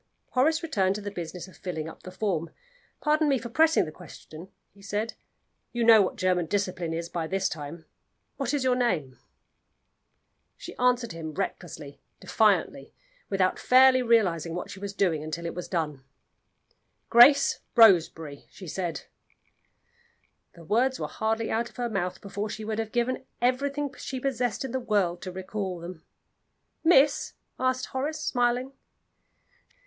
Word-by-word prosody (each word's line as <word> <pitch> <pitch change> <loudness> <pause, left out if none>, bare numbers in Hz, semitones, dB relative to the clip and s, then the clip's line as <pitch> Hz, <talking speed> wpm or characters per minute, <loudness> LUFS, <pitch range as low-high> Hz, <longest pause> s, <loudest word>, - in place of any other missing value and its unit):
Horace 315 +6 +2
returned 195 - +1
to 210 - -5
the 205 0 -5
business 175 0 -6
of 185 - -16
filling 160 -5 -5
up 160 - -11
the - - -9
form. 185 -4 -2 0.5
"Pardon 305 0 +2
me 275 - +3
for 235 0 -7
pressing 320 +5 +3
the 155 - -7
question," 165 0 -12 0.3
he 200 - -19
said. 205 +3 -3 0.6
"You 240 -1 0
know 225 -2 +8
what 190 - -1
German 180 -2 +1
discipline 185 -3 -2
is 165 +1 -3
by 170 -2 -3
this 190 +2 0
time. 155 +2 -7 0.5
What 270 -3 -1
is 290 -3 0
your 255 -1 +3
name?" 170 - -1 1.4
She - - -9
answered 250 -2 +2
him 160 -2 -7
recklessly, 165 -7 -5 0.2
defiantly, - - +1 0.3
without 190 -2 +1
fairly 255 0 +6
realizing 185 -9 +2
what 180 - -5
she 190 - -9
was 200 0 -5
doing 170 -7 +1
until 155 +2 -5
it 170 - -3
was 180 - -6
done. 150 -6 -3 1.1
"Grace 275 +4 +7 0.2
Roseberry," 165 - +4
she 190 - -12
said. 175 0 -4 1.5
The 170 - -13
words 250 +9 +1
were - - -2
hardly 225 +1 -2
out 230 +1 -1
of - - -23
her 240 -1 -2
mouth 185 -2 -2
before 200 +1 -4
she 215 +1 -6
would 220 0 -3
have 220 -1 -3
given 245 +2 -1 0.2
everything 280 +3 0
she 260 - -5
possessed 250 -2 -1
in 260 - -5
the 260 - -1
world 200 -7 0
to 185 - -6
recall 190 0 -4
them. 170 -1 -9 0.8
"Miss?" 295 -4 +4 0.3
asked 255 0 0
Horace, 290 +4 -3
smiling. 245 +1 0
205 Hz, 155 wpm, -27 LUFS, 175-250 Hz, 1.5 s, know